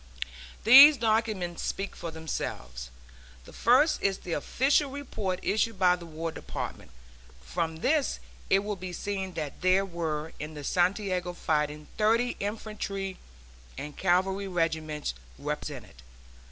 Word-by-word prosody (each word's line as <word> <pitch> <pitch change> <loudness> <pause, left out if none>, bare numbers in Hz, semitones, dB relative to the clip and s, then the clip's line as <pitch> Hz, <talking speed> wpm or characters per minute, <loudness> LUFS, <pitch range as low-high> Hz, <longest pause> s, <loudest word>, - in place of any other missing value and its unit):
These 275 +6 +10
documents 215 -6 0
speak 195 +1 -3
for 170 - -5
themselves. 65 - -5 0.6
The - - -13
first 255 +7 +4
is 195 -1 +1
the 175 - -5
official 275 - +2
report 220 -9 -3
issued 220 0 +1
by 180 -1 +5
the 175 -1 -10
War 165 +1 -4
Department. 60 - -6 0.5
From 160 - -3
this 300 -2 +2 0.3
it 195 +1 +4
will 210 0 -2
be 185 -1 -7
seen 190 -1 -4
that 150 -4 -5
there 185 +2 +4
were 160 -4 -3
in 155 +1 -6
the 145 - -7
Santiago 180 +1 0
fighting 150 -2 -1
thirty 230 +3 +3
infantry 200 -2 -4 0.6
and 150 0 -6
cavalry 190 +2 +1
regiments 160 - -1 0.2
represented. 60 - -6
185 Hz, 125 wpm, -28 LUFS, 160-210 Hz, 0.6 s, These